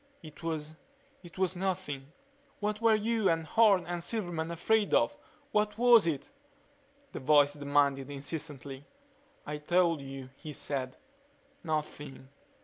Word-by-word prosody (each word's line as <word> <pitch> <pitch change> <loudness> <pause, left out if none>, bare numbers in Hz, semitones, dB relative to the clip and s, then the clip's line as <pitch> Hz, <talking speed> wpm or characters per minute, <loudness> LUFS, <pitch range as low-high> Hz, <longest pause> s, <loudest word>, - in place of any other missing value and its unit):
"It 155 -2 -12
was 155 -2 -3 0.5
it 175 -1 -14
was 185 -1 0
Nothing." 175 -7 -3 0.5
"What 210 +1 -2
were 225 -1 +5
you 220 -1 +1
and 165 0 +1
Horne 200 +1 +4
and 175 0 -3
Silverman 175 -6 -3
afraid 205 +5 +2
of - - +3 0.4
what 210 0 +1
was 235 -5 +6
it?" 160 - -2 0.8
the - - -6
voice 145 +1 +5
demanded 140 -2 +1
insistently. 145 -1 -6 0.6
"I 150 0 -4
told 170 0 +2
you," 135 -1 -8
he 155 - -8
said. 130 -2 -3 0.7
"Nothing." 150 -4 -4
160 Hz, 130 wpm, -31 LUFS, 145-190 Hz, 0.8 s, was